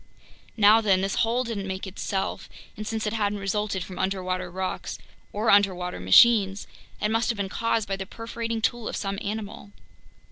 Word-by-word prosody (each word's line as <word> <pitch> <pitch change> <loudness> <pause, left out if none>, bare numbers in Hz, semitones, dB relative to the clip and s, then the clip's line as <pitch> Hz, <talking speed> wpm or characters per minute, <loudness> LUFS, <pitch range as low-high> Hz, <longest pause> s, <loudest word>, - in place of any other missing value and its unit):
Now 215 +1 +6
then, 195 -4 +3
this 195 +1 -1
hole 235 +3 +2
didn't 215 -5 -4
make 190 +1 -4
itself, 190 0 -4 0.3
and 215 0 -6
since 220 -1 -2
it 210 - -1
hadn't 205 -2 0
resulted 200 -1 -2
from 185 0 -9
underwater 185 -1 -2
rocks 185 +1 -4 0.3
or 215 +2 +1
underwater 185 - +2
machines, 195 - +5 0.3
it 210 - 0
must 225 +1 +1
have 230 - -1
been 200 -1 -2
caused 225 0 0
by 195 - -2
the 190 -1 -6
perforating 230 0 -5
tool 240 -1 0
of - - -4
some 195 -1 -3
animal. 205 -1 -5
205 Hz, 175 wpm, -26 LUFS, 190-220 Hz, 0.3 s, Now